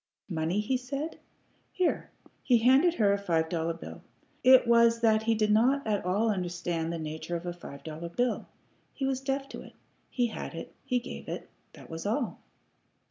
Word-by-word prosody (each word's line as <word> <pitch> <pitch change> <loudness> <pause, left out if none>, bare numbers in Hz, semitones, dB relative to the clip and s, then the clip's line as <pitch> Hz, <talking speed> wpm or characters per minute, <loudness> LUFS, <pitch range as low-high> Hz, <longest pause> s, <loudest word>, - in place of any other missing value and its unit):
"Money?" 165 +2 0
he 255 +5 0
said. 275 +5 -5 0.5
"Here." 365 -2 0 0.3
He 245 - +4
handed 265 +9 +5
her 205 -6 +3
a 200 - 0
five 165 -5 0
dollar 165 -1 -1
bill. 165 - -9 0.4
It 260 0 +8
was 235 0 +5
that 220 -1 +4
he 225 +1 +2
did 215 -1 +2
not 255 +6 +3
at 210 -2 0
all 205 +5 +2
understand 175 -3 -2
the 170 - -3
nature 160 +2 -4
of 170 +1 -5
a 175 - -3
five 140 -5 -11
dollar 160 +2 -6
bill. 245 +8 -1 0.5
He 275 - -2
was 265 -1 -1
deaf 270 0 -2
to - - -7
it. - - -13 0.4
He 245 - +1
had 230 - -5
it; - - -7
he 255 -2 0
gave 245 - -6
it; - - -6 0.2
that - - -13
was 165 +4 -4
all. 235 +3 -1
215 Hz, 190 wpm, -29 LUFS, 170-250 Hz, 0.5 s, It